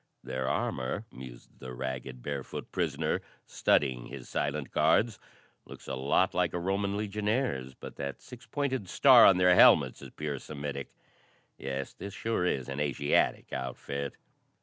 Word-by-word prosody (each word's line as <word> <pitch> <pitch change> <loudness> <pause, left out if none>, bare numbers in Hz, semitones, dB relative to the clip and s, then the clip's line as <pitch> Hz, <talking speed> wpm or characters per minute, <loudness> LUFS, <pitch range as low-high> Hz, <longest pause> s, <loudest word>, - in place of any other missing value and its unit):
"Their 65 0 -3
armor," 65 -1 -2
mused 65 -2 -12
the 65 -1 -8
ragged, 65 -1 -5
barefoot 70 -2 -5
prisoner, - - -1 0.2
studying 65 -4 +1
his 65 -2 -9
silent 70 -1 -2
guards, 95 +8 +2 0.4
"looks - - -13
a - - -3
lot 70 +8 +2
like 90 -2 +1
a 90 - -1
Roman 100 +2 -1
legionnaire's, 105 - -1
but - - -10
that 70 -1 -5
six 125 -1 -13
pointed 130 -6 -2
star 130 +1 +8
on 95 - +6
their 90 0 +5
helmets - - +6
is - - -9
pure 75 -3 -4
Semitic. 70 -2 -6 0.7
Yes, 65 0 -4
this 100 +1 -8
sure 110 -6 -1
is 65 -7 -1
an 70 +1 -5
Asiatic 70 0 +1
outfit." 70 +2 -4
70 Hz, 150 wpm, -30 LUFS, 65-100 Hz, 0.7 s, star